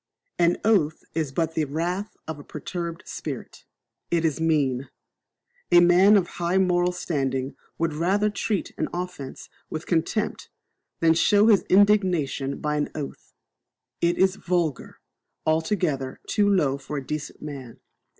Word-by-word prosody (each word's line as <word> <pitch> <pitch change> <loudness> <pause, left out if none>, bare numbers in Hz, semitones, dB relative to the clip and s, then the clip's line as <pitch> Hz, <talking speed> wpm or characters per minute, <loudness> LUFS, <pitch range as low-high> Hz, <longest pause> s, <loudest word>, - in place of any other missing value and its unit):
An 175 0 +4
oath 180 -9 +2
is 155 -4 -1
but 165 +3 -1
the 155 - 0
wrath 175 +8 -3
of 160 -2 -5
a - - -10
perturbed 170 +3 -6
spirit. - - -7 0.4
It 170 -1 +1
is 160 -1 0
mean. 140 -5 +1 0.8
A 175 - +8
man 180 +4 +6
of 190 - +2 0.2
high 175 +2 +1
moral 180 -1 +3
standing 135 -6 -2 0.2
would 165 -1 0
rather 195 +7 +1
treat 205 0 -2
an - - -1
offence 180 -7 -6 0.2
with 155 +1 -5
contempt 175 +5 -1 0.5
than 165 -1 +5
show 205 +6 +4
his 205 -3 +6
indignation 185 -9 +3
by 150 0 -1
an 145 - -1
oath. 145 -3 -7 0.7
It 170 0 +2
is 190 0 +3
vulgar, 170 -6 -2 0.5
altogether 160 -5 0
too 205 -1 +2
low 145 -9 +2
for 145 +2 -6
a 135 - -5
decent 150 +1 -5
man. 135 -6 -8
165 Hz, 140 wpm, -25 LUFS, 150-185 Hz, 0.8 s, A